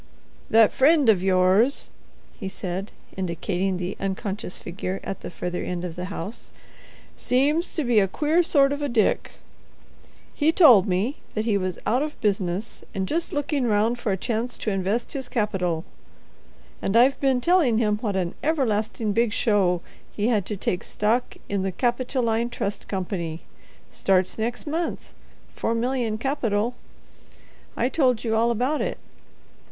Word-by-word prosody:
"That 225 -1 +5
friend 285 -2 +4
of 200 -5 +4
yours," 190 +7 +3 0.5
he 195 - -4
said, 190 +1 -5 0.2
indicating 185 +1 -1
the 180 +2 -3
unconscious 195 0 -3
figure 185 +2 -5
at 195 - -5
the - - -6
further 180 0 -4
end 180 0 -3
of 170 -2 -6
the 180 - -4
house, 200 +3 -6 0.7
"seems 290 +7 +1
to 315 - 0
be 240 -4 +4
a 195 - +3
queer 305 - +2
sort 280 -5 +3
of 285 - -4
a 290 - -1
Dick. 235 -3 +1 1.0
He 305 +1 +2
told 250 - +7
me 200 +9 0 0.2
that 215 0 -1
he 220 -3 +2
was 185 -2 -1
out 250 +4 +2
of 300 0 -4
business, 195 0 -2
and 190 -1 -1
just 330 - -1
looking 290 -3 0
round 220 +3 +2
for 220 - -1
a 190 - 0
chance 235 +3 -2
to 215 - -2
invest 195 +5 -1
his 265 -3 -5
capital. 180 -7 -1 1.0
And 200 +4 +1
I've 255 +3 +5
been 265 -2 +2
telling 305 -6 +3
him 210 -2 +2
what 210 -4 -2
an 180 -2 -1
everlasting 225 -7 0
big 230 +1 +2
show 195 -6 +2 0.3
he 210 +2 0
had 210 -6 +1
to 210 - -4
take 180 -1 -2
stock 225 +4 -1
in 200 -1 -1
the 190 0 -1
Capitoline 240 0 0
Trust 205 -4 -4
Company—starts 185 +1 -3
next 235 +2 -2
month—four 310 -6 -4
million 235 -2 -1
capital—I 240 -1 -4
told 255 -4 +2
you 225 -2 0
all 230 +2 +3
about 250 +6 0
it. - - -2
220 Hz, 150 wpm, -24 LUFS, 190-250 Hz, 1.0 s, told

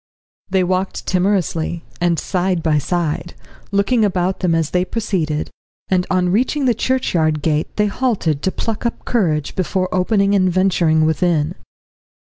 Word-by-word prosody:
They 190 -1 +2
walked 185 +1 -2
timorously, 180 -3 0 0.2
and 175 -1 +2
side 180 -1 -1
by 155 -2 +2
side, 170 +1 -2 0.4
looking 200 +4 +2
about 185 -2 0
them 175 -3 +1
as 165 -2 0
they 180 0 +2
proceeded, 185 -8 -2 0.4
and 185 -1 +1
on 180 -1 +2
reaching 255 +8 +1
the 245 - +4
churchyard 170 - 0
gate 155 -1 +1
they 210 - +2
halted 200 - 0
to 190 - 0
pluck 225 +2 -4
up 235 - -3
courage 160 - 0
before 185 0 -1
opening 195 +2 +2
and 185 -2 +3
venturing 170 -4 +2
within. 160 0 +1
180 Hz, 145 wpm, -19 LUFS, 165-200 Hz, 0.4 s, the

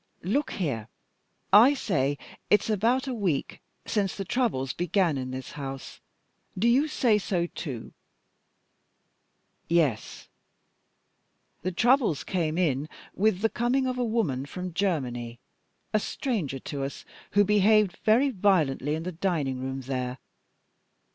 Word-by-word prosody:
Look 265 - 0
here! 130 - -2 0.7
I 240 +8 +8
say 145 - 0 0.3
it's 210 +1 +3
about 235 +6 +2
a 260 - -2
week 190 - -2 0.2
since 200 -3 0
the 195 - -4
troubles 190 - 0
began 175 -2 +1
in 130 -1 -4
this 130 0 -6
house. 135 -2 -7 0.6
Do 215 +6 +2
you 265 +6 +4
say 235 -8 +2
so 180 -3 -1
too?" 140 -8 -7 1.7
"Yes." 155 -10 0 1.3
"The 185 - -2
troubles 235 - +2
came 165 -4 -1
in 150 -4 0 0.2
with 200 -1 +1
the 225 - +3
coming 245 +3 +1
of 255 -1 -2
a - - +1
woman 190 - -1
from 180 +4 -6
Germany, 125 -11 -2 0.5
a 215 - +4
stranger 200 - -2
to 140 +1 -5
us, 135 - -6 0.3
who 205 - +6
behaved 210 -1 +4
very 250 +6 +3
violently 160 - +2
in 160 - -4
the 185 - -3
dining 160 -7 -1
room 130 +1 -4
there. 130 -1 -3
180 Hz, 130 wpm, -27 LUFS, 135-215 Hz, 1.7 s, I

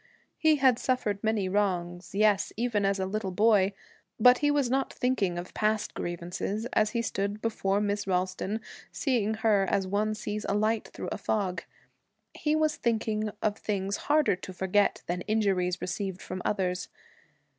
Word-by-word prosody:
He 315 -1 +5
had 260 -4 +4
suffered 215 -6 -1
many 215 -3 +1
wrongs, 180 -2 -1
yes, 210 -1 +3
even 225 -4 0
as 195 0 +2
a 190 - -1
little 200 0 -2
boy, 205 0 +4 0.5
but 250 +3 +7
he 290 - +2
was 290 -3 +2
not 265 +2 0
thinking 205 -9 0
of 175 +1 -6
past 215 0 0
grievances 175 +5 -3
as 215 0 +3
he 230 +2 -1
stood 200 -1 -2
before 205 -3 0
Miss 205 -1 -1
Ralston, 185 +3 -1 0.3
seeing 225 -6 0
her 215 -3 +3
as 195 - +1
one 210 +3 0
sees 210 0 -4
a 200 - +1
light 215 +1 +1
through - - -6
a - - -3
fog. 190 -4 -1 0.7
He 300 0 0
was 310 -1 +1
thinking 220 -2 0
of 210 -1 +1
things 200 -1 -2
harder 300 -8 +4
to 185 - -8
forget 190 +2 +1
than 180 +1 -2
injuries 190 -5 +1
received 190 -1 -3
from 185 - -5
others. 185 -3 -1
205 Hz, 165 wpm, -28 LUFS, 190-220 Hz, 0.7 s, but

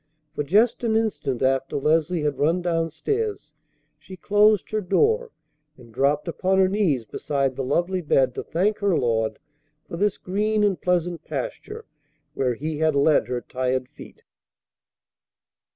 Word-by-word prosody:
For - - -2
just 215 - +2
an 225 -2 +1
instant 200 - -1
after 135 0 0
Leslie 160 +3 +1
had 145 -2 -1
run 165 +4 +1
down 165 -2 0
stairs 420 - -3 0.5
she 185 - -12
closed 210 +1 +3
her 215 0 0
door, 450 - +1 0.5
and 120 -3 -16
dropped 145 +6 +1
upon 185 +3 0
her 190 -1 +5
knees 185 - 0
beside 135 +3 -2
the 135 - -3
lovely 175 +7 0
bed 135 -5 +2
to - - -4
thank 205 +5 0
her 200 -5 +2
Lord 110 -2 0 0.5
for 170 - -6
this 205 +1 +1
green 210 +3 0
and 200 -3 +1
pleasant 175 -1 -1
pasture 455 -3 -6 0.5
where 125 -4 0
He 150 +4 -4
had 155 -2 +2
led 140 -4 +3
her 125 -1 -3
tired 130 0 -2
feet. - - -14
170 Hz, 150 wpm, -24 LUFS, 135-205 Hz, 0.5 s, her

